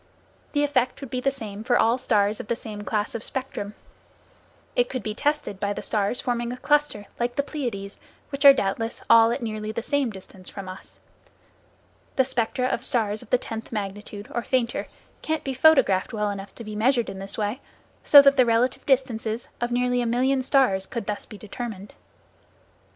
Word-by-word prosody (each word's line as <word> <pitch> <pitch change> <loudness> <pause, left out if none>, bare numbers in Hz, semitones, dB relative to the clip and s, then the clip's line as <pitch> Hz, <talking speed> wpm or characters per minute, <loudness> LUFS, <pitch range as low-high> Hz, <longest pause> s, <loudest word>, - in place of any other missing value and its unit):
The 290 -1 +2
effect 260 -4 +1
would 270 -4 -8
be 255 - -2
the 275 - +2
same 220 -6 -7
for 245 +1 +3
all 230 +3 +3
stars 210 -4 +1
of - - -7
the 235 - 0
same 215 -3 -7
class 210 0 -1
of 230 - -4
spectrum. 255 -6 -5 1.0
It 245 0 +2
could 255 - -4
be 215 - -3
tested 290 -6 -1
by 205 0 -1
the - - -6
stars 210 +2 0
forming 240 -1 -2
a 250 - -5
cluster, 290 -6 +1
like 240 0 -1
the 280 - +1
Pleiades, 235 -10 -5 0.3
which 275 -1 -3
are 280 - +12
doubtless 225 -2 -2
all 230 0 +8
at 240 +2 -2
nearly 215 -1 -3
the 225 +1 -4
same 285 -2 0
distance 190 -2 -10
from 195 -2 -8
us. 185 0 -9 1.2
The 265 - +4
spectra 250 0 -1
of 245 -1 -1
stars 220 -6 0
of - - -14
the 250 - +4
tenth 225 -2 -7
magnitude, 205 -1 -5
or 240 - 0
fainter, 240 -1 -1 0.3
can 315 0 -1
be 270 - -3
photographed 260 -11 +4
well 210 -1 0
enough 195 0 -8
to 235 - -8
be 215 -1 -7
measured 240 +2 +2
in 190 - -6
this 195 +1 -3
way, 215 +5 -2 0.4
so 285 -1 +9
that 275 0 +5
the 255 - +6
relative 230 +2 +2
distances 240 -4 0
of 240 - 0
nearly 245 0 +1
a 240 - -1
million 260 +3 +2
stars 255 -8 +2
could 235 -5 -5
be 210 - -1
thus - - -6
determined. 210 -1 -7
235 Hz, 195 wpm, -25 LUFS, 210-260 Hz, 1.2 s, are